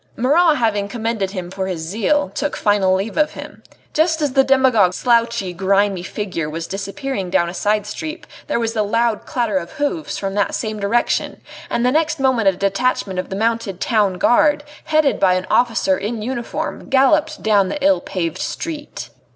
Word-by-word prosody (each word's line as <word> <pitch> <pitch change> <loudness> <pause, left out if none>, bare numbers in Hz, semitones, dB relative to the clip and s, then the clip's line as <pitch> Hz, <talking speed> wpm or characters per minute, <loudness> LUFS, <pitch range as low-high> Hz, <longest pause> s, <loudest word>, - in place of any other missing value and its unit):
Marat 300 +6 +3
having 210 -4 0
commended 225 -2 -2
him 185 -3 -6
for 190 0 -3
his 180 -3 -3
zeal 225 - 0
took 295 - -2
final 200 -3 +2
leave 195 +4 -3
of 305 -1 +2
him. - - -10 0.3
Just 320 +1 +2
as 295 -4 -1
the 270 0 +5
demagogue's 255 -9 +3
slouchy, 230 -6 +1
grimy 195 +1 +1
figure 180 -4 -4
was 165 +2 -5
disappearing 195 +2 -4
down 175 -2 +1
a - - -7
side 210 +2 0
street 310 +10 -6 0.2
there 295 - 0
was 225 -1 -1
the 220 - 0
loud 230 +1 0
clatter 230 -6 0
of 170 -1 -10
hoofs 305 +2 -2
from 195 -1 -3
that 200 0 0
same 215 -2 -3
direction, 215 +4 0 0.3
and 235 - 0
the 250 - +3
next 315 +1 +1
moment 260 -6 +2
a 195 - +5
detachment 195 0 -1
of 185 - -4
the 190 - -4
mounted 225 -3 -1
Town 210 -5 +1
Guard, 290 +10 +3 0.2
headed 310 -3 +2
by 185 -1 +4
an 185 0 -2
officer 225 -6 +2
in 215 +1 -4
uniform, 240 0 -4
galloped 300 +3 +2
down 205 -3 +3
the - - -3
ill 290 -1 +4
paved 170 -4 -3
street. 320 -3 -5
220 Hz, 185 wpm, -19 LUFS, 195-265 Hz, 0.3 s, the